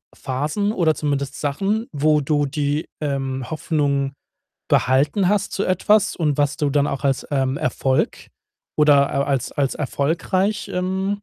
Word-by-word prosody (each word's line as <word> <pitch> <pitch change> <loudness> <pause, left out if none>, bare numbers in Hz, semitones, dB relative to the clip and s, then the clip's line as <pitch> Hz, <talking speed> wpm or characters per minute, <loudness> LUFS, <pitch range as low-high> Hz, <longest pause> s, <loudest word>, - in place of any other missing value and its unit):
Phasen 150 +10 -2
oder 165 -5 +2
zumindest 140 -1 -2
Sachen, 195 +11 -1
wo 150 +1 +3
du 145 +1 +1
die, 145 +2 -1 0.2
ähm, 135 -3 -2
Hoffnung 145 -3 0 0.6
behalten 145 +9 +2
hast 205 -1 +1
zu 200 - -1
etwas, 205 +3 +2
und 150 -4 0
was 145 -1 +1
du 150 -3 0
dann 145 0 +2
auch 140 -1 -3
als, 135 -2 0
ähm, 135 -1 +1
Erfolg 130 +1 -1 0.5
oder 145 -2 +5
al 140 - 0
als 135 -3 -1
als 140 -2 0
erfolgreich, 175 +9 -1
ähm, 190 +3 -2
145 Hz, 145 wpm, -21 LUFS, 140-180 Hz, 0.6 s, oder